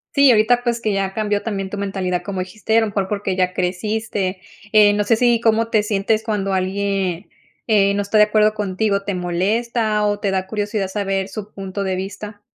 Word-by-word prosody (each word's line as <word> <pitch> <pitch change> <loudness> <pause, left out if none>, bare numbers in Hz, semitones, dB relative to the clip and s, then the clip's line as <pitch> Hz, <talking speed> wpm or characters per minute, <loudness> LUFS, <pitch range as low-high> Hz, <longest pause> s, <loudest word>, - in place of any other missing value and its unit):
Sí, 280 -2 +6
ahorita, 240 +2 +3
pues, 235 -1 -1
que 215 - 0
ya 195 -1 -1
cambió 210 -1 -1
también 195 -4 -3
tu 205 - -6
mentalidad 190 -3 -2
como 195 -2 -4
dijiste, 210 +4 -2
a - - +5
lo 220 - 0
mejor 200 -2 -2
porque 200 -2 -2
ya 185 -1 0
creciste. 190 +1 -2 0.3
Eh, 210 -1 +6
no 205 0 +1
sé 225 +3 +3
sí 240 0 +3
cómo 225 0 +2
te 215 -2 +2
sientes 210 +1 0
cuando 205 -3 -1
alguien, 190 -1 -1 0.4
eh, 200 -3 +3
no 205 - 0
está 200 +2 0
de 210 - +8
acuerdo 215 0 +3
contigo, 200 0 -1
¿te 200 - -3
molesta 210 +5 0
o 205 0 0
te 200 -2 -1
da 190 0 -1
curiosidad 205 -1 -2
saber 195 -1 -2
su 210 +1 -7
punto 195 0 -5
de 190 -1 -1
vista? 205 +2 -7
205 Hz, 205 wpm, -20 LUFS, 190-215 Hz, 0.4 s, de